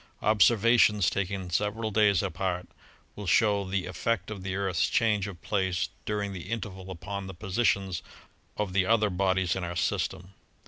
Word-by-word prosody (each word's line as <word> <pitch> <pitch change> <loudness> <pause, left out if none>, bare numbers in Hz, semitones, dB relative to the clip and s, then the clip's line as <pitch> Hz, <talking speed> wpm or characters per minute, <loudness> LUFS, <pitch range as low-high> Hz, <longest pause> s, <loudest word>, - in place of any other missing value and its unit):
Observations, 105 -1 +4
taken 95 -2 -3
several 105 +4 -1
days 105 -3 +3
apart, 90 +1 -2 0.5
will 105 -2 -7
show 100 +3 +3
the 95 -1 -2
effect 95 +2 -2
of 100 -3 -6
the 95 0 -3
Earth's 95 -4 0
change 105 -4 +2
of 95 -4 -8
place 95 -4 0 0.2
during 105 -1 -2
the 90 0 -8
interval 95 -5 -5
upon 95 +2 -6
the 95 - -8
positions 95 -1 0 0.6
of 105 -3 -2
the 95 0 +3
other 110 +1 +2
bodies 95 0 +1
of 95 - -3
our 85 0 -4
system. 90 +2 -2
95 Hz, 155 wpm, -28 LUFS, 95-105 Hz, 0.6 s, Observations